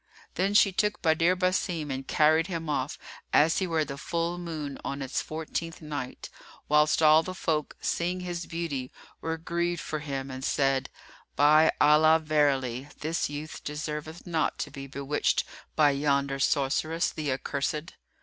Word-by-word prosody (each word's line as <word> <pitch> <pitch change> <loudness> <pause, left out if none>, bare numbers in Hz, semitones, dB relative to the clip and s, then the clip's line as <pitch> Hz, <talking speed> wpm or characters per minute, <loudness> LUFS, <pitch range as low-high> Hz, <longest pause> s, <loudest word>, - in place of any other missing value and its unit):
[FN#339] - - -40
Then 195 +3 0
she 200 -1 +6
took 210 +2 0
Badr 165 +2 +3
Basim 180 -4 0
and 135 0 -4
carried 160 +2 +4
him 165 -4 -4
off, 140 -1 -1 0.3
as 160 +3 +4
he 190 - -1
were 160 -2 +1
the 140 -1 -7
full 170 +3 -2
moon 155 -5 -5
on 140 - -4
its 135 -1 -2
fourteenth 160 +2 -5
night, 145 -5 -6 0.4
whilst 150 +1 +3
all 155 +1 +7
the 185 +2 -6
folk, 155 -4 -1
seeing 180 +2 -1
his 175 -1 -4
beauty, 150 -7 -4 0.3
were 160 0 -2
grieved 170 +1 -1
for 155 - -4
him 135 -2 -4
and 130 0 -7
said, 135 -1 +1 0.5
"By 155 +2 +6
Allah, 155 +2 +6
verily, 140 -5 +1
this 160 0 -1
youth 150 +2 -7
deserveth 150 +2 -5
not 165 -3 0
to - - -4
be 135 -1 -8
bewitched 140 +2 0 0.3
by 150 -2 +5
yonder 140 -1 0
sorceress, 155 +4 +1
the 150 -3 -3
accursed!" 145 +4 -3
155 Hz, 160 wpm, -28 LUFS, 140-165 Hz, 0.5 s, all